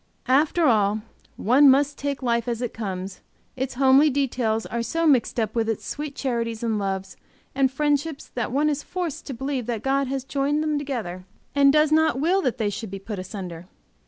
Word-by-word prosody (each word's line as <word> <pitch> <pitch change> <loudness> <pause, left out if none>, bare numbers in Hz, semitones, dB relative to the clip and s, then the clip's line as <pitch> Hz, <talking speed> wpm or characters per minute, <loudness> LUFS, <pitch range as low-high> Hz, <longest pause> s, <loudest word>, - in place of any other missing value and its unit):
After 300 +5 +3
all, 215 -4 +3 0.4
one 270 +6 +5
must 285 +2 +3
take 280 -1 -4
life 235 -1 0
as 235 -2 -2
it 240 - -3
comes, 190 -3 -5 0.3
its 265 0 -3
homely 270 +3 +5
details 245 -5 0
are 235 - -3
so 330 +8 -1
mixed 260 -5 +3
up 220 -2 -1
with 225 -1 0
its 225 - -3
sweet 295 -1 -5
charities, 230 -4 -2
and 220 -2 0
loves, 190 -1 -3 0.4
and 265 -1 +2
friendships 295 +1 -1
that 240 -2 -2
one 290 +4 +2
is 295 -1 0
forced 355 -5 -5
to 270 - -5
believe 265 -1 -3
that 230 -3 -3
God 275 0 +1
has 270 0 -3
joined 280 +3 0
them 305 -1 0
together 220 -11 -5 0.3
and 280 -1 +5
does 305 +1 +3
not 315 -4 +3
will 360 +7 +2
that 255 -7 -1
they 210 -3 0
should 220 +1 -6
be 195 - -6
put 200 0 -6
asunder. 185 -3 -7
260 Hz, 195 wpm, -24 LUFS, 220-285 Hz, 0.4 s, one